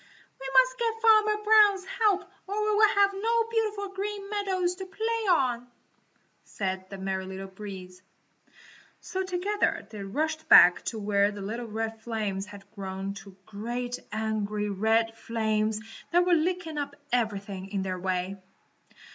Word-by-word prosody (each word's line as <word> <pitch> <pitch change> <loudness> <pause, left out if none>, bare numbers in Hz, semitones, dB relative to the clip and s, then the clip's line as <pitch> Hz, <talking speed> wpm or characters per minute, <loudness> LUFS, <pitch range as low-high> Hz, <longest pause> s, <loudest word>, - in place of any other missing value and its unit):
"We 270 - -6
must - - +4
get 455 -1 -1
Farmer 430 -1 +5
Brown's 420 -3 +5
help 400 -2 +1 0.2
or 400 - -3
we 425 0 +1
will 430 +1 +6
have 400 0 +5
no 455 +3 +1
beautiful 425 -3 -1
Green 400 +1 -5
Meadows 380 -4 0
to 380 - -6
play 445 +3 -2
on," 250 -7 +2 0.8
said 190 -2 -4
the 195 - -7
Merry 190 0 -3
Little 190 0 -6
Breeze. 190 -2 -9 1.0
So 380 - -4
together 380 +3 -1
they 210 -2 -7
rushed 310 +10 -3
back 175 0 +8
to 225 - -3
where 200 -1 +2
the 205 -1 -7
little 230 +4 -4
red 225 0 -4
flames 210 -4 -3
had 205 -1 -11
grown 195 -2 -5
into 200 -1 -9
great, 240 +4 -4
angry, 210 -1 -2
red 225 +3 +1
flames 220 -1 -1 0.3
that 350 +1 +4
were 360 - +3
licking 330 -1 0
up 285 0 -4 0.2
everything 200 -5 -2
in 195 -2 -1
their 185 -1 -3
way. 185 +1 -2
235 Hz, 150 wpm, -28 LUFS, -, 1.0 s, back